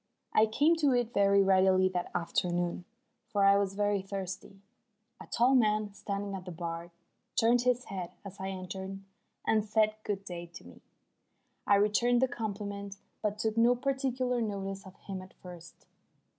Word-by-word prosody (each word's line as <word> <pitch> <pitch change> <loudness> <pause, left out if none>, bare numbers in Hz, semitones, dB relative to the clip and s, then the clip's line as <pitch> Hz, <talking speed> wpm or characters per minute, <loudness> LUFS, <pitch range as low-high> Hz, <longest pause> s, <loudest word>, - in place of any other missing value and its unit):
I 220 - +5
came 295 +10 +3
to 290 -4 +3
it 240 -1 0
very 200 0 +4
readily 190 -1 +4
that 180 -1 -3
afternoon, 175 +1 -1 0.4
for 200 -1 +1
I 195 0 +7
was 195 -1 0
very 205 -1 +1
thirsty. 195 0 -6 0.6
A - - -10
tall 245 +3 +3
man 215 -4 +2
standing 200 0 -4
at 185 -2 -6
the 180 - -6
bar 170 0 -5 0.5
turned 235 +2 +4
his 250 0 +1
head 185 -3 -5 0.2
as 200 0 -9
I 190 0 -3
entered 190 +1 -6 0.5
and 215 -1 +3
said 215 0 +2
"Good 200 -1 -3
day" 175 -2 -6
to - - -9
me. - - -14 0.9
I 200 - +6
returned 210 +4 +3
the 260 - +3
compliment, 200 -3 -5 0.2
but 210 -1 -1
took 220 +1 -1
no 235 +2 +5
particular 255 -2 -1
notice 195 -2 -4
of 190 - -13
him 190 -2 -6
at 185 0 -14
first. 175 -2 -12
200 Hz, 165 wpm, -31 LUFS, 190-225 Hz, 0.9 s, I